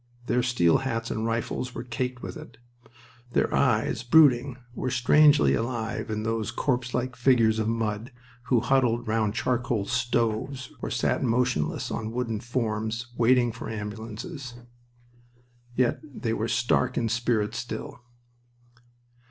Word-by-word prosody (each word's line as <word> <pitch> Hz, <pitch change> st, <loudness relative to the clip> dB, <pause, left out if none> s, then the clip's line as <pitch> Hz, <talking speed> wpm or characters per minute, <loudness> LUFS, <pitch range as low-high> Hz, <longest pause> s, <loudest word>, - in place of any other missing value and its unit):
Their 125 Hz, 0 st, +2 dB
steel 120 Hz, -10 st, +3 dB
hats 115 Hz, -3 st, -3 dB
and 110 Hz, +1 st, -2 dB
rifles 115 Hz, +2 st, -2 dB
were -, -, -4 dB
caked 125 Hz, +1 st, -4 dB
with -, -, -6 dB
it. -, -, -11 dB, 0.8 s
Their -, -, +1 dB
eyes, 115 Hz, -3 st, +2 dB
brooding, 130 Hz, -1 st, +4 dB, 0.2 s
were 130 Hz, -, -2 dB
strangely 145 Hz, +4 st, +5 dB
alive 115 Hz, -1 st, -2 dB
in 110 Hz, 0 st, -2 dB
those 115 Hz, 0 st, -1 dB
corpselike 125 Hz, 0 st, -1 dB
figures 115 Hz, -3 st, +3 dB
of 110 Hz, -, 0 dB
mud 115 Hz, +2 st, -2 dB, 0.3 s
who 125 Hz, -3 st, +3 dB
huddled 120 Hz, -2 st, +2 dB
round 110 Hz, -1 st, 0 dB
charcoal 120 Hz, -4 st, 0 dB
stoves 120 Hz, +2 st, -1 dB
or -, -, -3 dB
sat -, -, 0 dB
motionless 125 Hz, -, 0 dB
on 110 Hz, 0 st, -3 dB
wooden 120 Hz, -3 st, -2 dB
forms, 115 Hz, 0 st, -3 dB
waiting 120 Hz, 0 st, +3 dB
for 115 Hz, -, -7 dB
ambulances. 115 Hz, +6 st, -6 dB, 1.2 s
Yet 125 Hz, 0 st, +2 dB
they 125 Hz, -6 st, -4 dB
were 110 Hz, 0 st, -1 dB
stark 120 Hz, +2 st, +1 dB
in 115 Hz, -, +1 dB
spirit 115 Hz, -2 st, 0 dB
still. 120 Hz, 0 st, -6 dB
120 Hz, 130 wpm, -26 LUFS, 110-125 Hz, 1.2 s, strangely